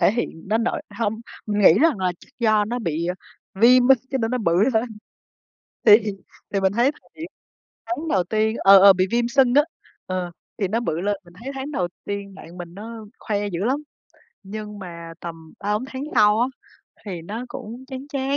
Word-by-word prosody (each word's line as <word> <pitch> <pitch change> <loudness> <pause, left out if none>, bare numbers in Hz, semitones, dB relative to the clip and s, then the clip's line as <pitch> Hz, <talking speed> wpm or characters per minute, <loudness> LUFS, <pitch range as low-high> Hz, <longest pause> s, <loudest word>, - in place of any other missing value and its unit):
thể 180 +2 +4
hiện 215 -7 -4
đến 220 +3 +2
nỗi 300 - -1 0.2
hông, 220 -2 0 0.3
mình 210 -1 -1
nghĩ 185 - +8
rằng 320 -9 +3
là 185 -1 0
chắc - - -18
do 215 -3 +3
nó 240 +4 -3
bị, 170 -6 -2
à, 180 - -1 0.5
viêm 250 +2 +6
á, 270 - +9 0.2
cho 265 - 0
nên 225 -2 -1
nó 250 - 0
bự 170 -8 +1 0.2
hơn. 220 +1 +3 1.0
Thì 210 -1 +10 0.6
thì 195 - +2
mình 190 0 +2
thấy 240 +6 +3
thời - - -24
điểm 325 - -7 0.6
tháng 330 -2 -3
đầu 190 - +2
tiên 220 +4 0
ờ, 195 0 +8
ờ, 200 +1 +9
bị 185 0 +1
viêm 235 0 +1
sưng 260 -1 +3
á, 290 - +7 0.4
ờ, 185 -1 -3 0.3
thì 195 - 0
nó 225 +5 0
bự 165 -8 -2
lên, 205 +2 0
mình 175 0 -18
thấy 265 - -5
tháng 270 +2 -5
đầu 180 -10 -1 0.2
tiên 200 -1 -5
bạn 175 -2 -12
mình 175 -1 -8
nó 220 +2 -8
khoe 205 -1 -2
dữ 180 0 -3
lắm, 270 +5 0 0.6
nhưng 210 +1 -7
mà 170 -3 -8
tầm 165 -2 -9
3-4 210 +4 -1
tháng 265 +1 -5
sau 210 -1 +5
á 245 - +3 0.6
thì 180 -4 -5
nó 220 +8 -5
cũng 240 +4 -8
chán 265 0 -7
chán, 275 0 -1
210 Hz, 210 wpm, -23 LUFS, 185-245 Hz, 1.0 s, Thì